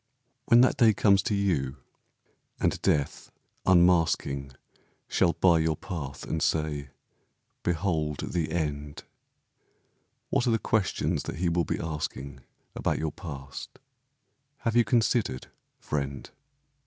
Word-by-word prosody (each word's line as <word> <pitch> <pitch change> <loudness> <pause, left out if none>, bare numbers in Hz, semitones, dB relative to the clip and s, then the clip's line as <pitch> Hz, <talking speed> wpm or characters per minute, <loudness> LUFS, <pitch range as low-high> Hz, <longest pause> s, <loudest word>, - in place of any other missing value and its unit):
When 120 +1 +6
that 130 - +3
day 110 -3 +5
comes 100 -1 +4
to 105 - -1
you, 75 -9 0 0.8
and - - 0
Death, 70 -2 0 0.4
unmasking, 85 -7 +3 0.5
Shall 85 -3 +2
bar 85 0 +4
your 80 0 +1
path, 80 -9 -6
and 80 - -2
say, 75 -3 0 0.7
"Behold 80 -4 -1
the 85 -3 -1
end," 75 -3 -3 1.3
What 125 - +2
are - - +3
the 115 - +3
questions 110 -2 0
that - - -4
he 85 +2 0
will 85 0 +1
be - - -2
asking 70 -4 -4 0.3
About - - -1
your 80 -1 -2
past? 70 -4 -8 0.8
Have 115 -2 -1
you 120 - +6
considered, 110 - 0 0.3
friend? 70 -2 -4
80 Hz, 120 wpm, -28 LUFS, 70-95 Hz, 1.3 s, When